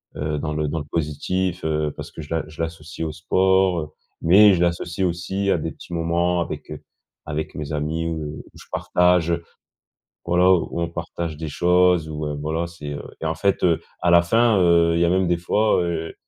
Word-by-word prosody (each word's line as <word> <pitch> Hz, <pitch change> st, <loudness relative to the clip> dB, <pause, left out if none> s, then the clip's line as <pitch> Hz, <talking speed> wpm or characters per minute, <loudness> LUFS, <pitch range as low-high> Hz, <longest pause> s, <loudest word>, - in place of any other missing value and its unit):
heu, 75 Hz, 0 st, -2 dB
dans 75 Hz, -1 st, -3 dB
le 75 Hz, 0 st, -1 dB
dans 80 Hz, -, -3 dB
le 75 Hz, -, -6 dB
positif, 85 Hz, +3 st, -2 dB
heu, 75 Hz, -1 st, 0 dB
parce -, -, -7 dB
que -, -, -8 dB
je 75 Hz, -, -11 dB
la 80 Hz, -, 0 dB, 0.2 s
l'associe 80 Hz, 0 st, -4 dB
au 80 Hz, -, -3 dB
sport, 95 Hz, +2 st, +2 dB
heu, 75 Hz, -, -6 dB, 0.3 s
mais 100 Hz, +4 st, +7 dB
je 85 Hz, -, 0 dB
l'associe 85 Hz, +2 st, 0 dB
aussi 95 Hz, +3 st, -2 dB
à -, -, +3 dB
des 80 Hz, 0 st, -4 dB
petits -, -, -14 dB
moments 85 Hz, +1 st, +1 dB
avec, 85 Hz, -, -5 dB
heu, -, -, -7 dB, 0.4 s
avec 75 Hz, 0 st, -4 dB
mes 75 Hz, 0 st, -5 dB
amis 80 Hz, +2 st, -2 dB
où 80 Hz, -2 st, -5 dB
je -, -, -14 dB
partage, 90 Hz, -1 st, +2 dB, 0.9 s
voilà, 90 Hz, +1 st, +3 dB
où 85 Hz, -1 st, +1 dB
on 85 Hz, -, 0 dB
partage 85 Hz, -1 st, -5 dB
des 80 Hz, -1 st, -5 dB
choses 90 Hz, 0 st, +3 dB
où 75 Hz, 0 st, -4 dB
heu, 75 Hz, -, -3 dB
voilà 80 Hz, +3 st, -1 dB
c'est, 75 Hz, -4 st, -7 dB
heu 70 Hz, -, -6 dB, 0.2 s
et -, -, -3 dB
en 80 Hz, 0 st, -1 dB
fait, 100 Hz, +2 st, 0 dB
heu, 85 Hz, -2 st, +3 dB, 0.2 s
à 90 Hz, -, +2 dB
la 85 Hz, 0 st, +7 dB
fin, 115 Hz, +4 st, +3 dB
heu, 85 Hz, -1 st, +4 dB
il 85 Hz, -, +1 dB
y -, -, +5 dB
a 85 Hz, -, +2 dB
même 95 Hz, 0 st, +2 dB
des 85 Hz, 0 st, +2 dB
fois, 105 Hz, +3 st, +2 dB
heu, 80 Hz, -1 st, -3 dB
85 Hz, 210 wpm, -22 LUFS, 80-90 Hz, 0.9 s, mais